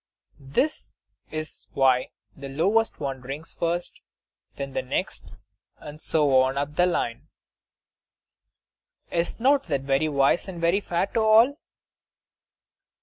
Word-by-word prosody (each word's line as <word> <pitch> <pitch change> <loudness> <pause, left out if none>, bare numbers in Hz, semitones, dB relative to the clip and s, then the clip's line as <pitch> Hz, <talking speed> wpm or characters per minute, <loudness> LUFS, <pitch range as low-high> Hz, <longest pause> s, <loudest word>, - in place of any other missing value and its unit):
That 305 +3 0 0.4
is 155 -1 -6
why 130 -2 +3 0.3
the 140 0 -8
lowest 200 +11 +1
one 135 -3 -4
drinks 140 +5 -7
first, 170 +1 -3 0.5
then 140 -1 -5
the - - -1
next, 130 - -3 0.5
and 150 +1 -11
so 145 -4 +3
on 130 +1 0
up 145 +1 -2
the 180 +2 +4
line. 120 -9 -2 1.8
Is 170 +5 -1
not 275 +3 +3
that 140 -5 0
very 135 +3 +1
wise, 140 +6 +2
and 180 -3 -7
very 170 +4 +2
fair 175 -1 0
to 225 - -2
all? 225 +6 +5
155 Hz, 125 wpm, -25 LUFS, 135-190 Hz, 1.8 s, all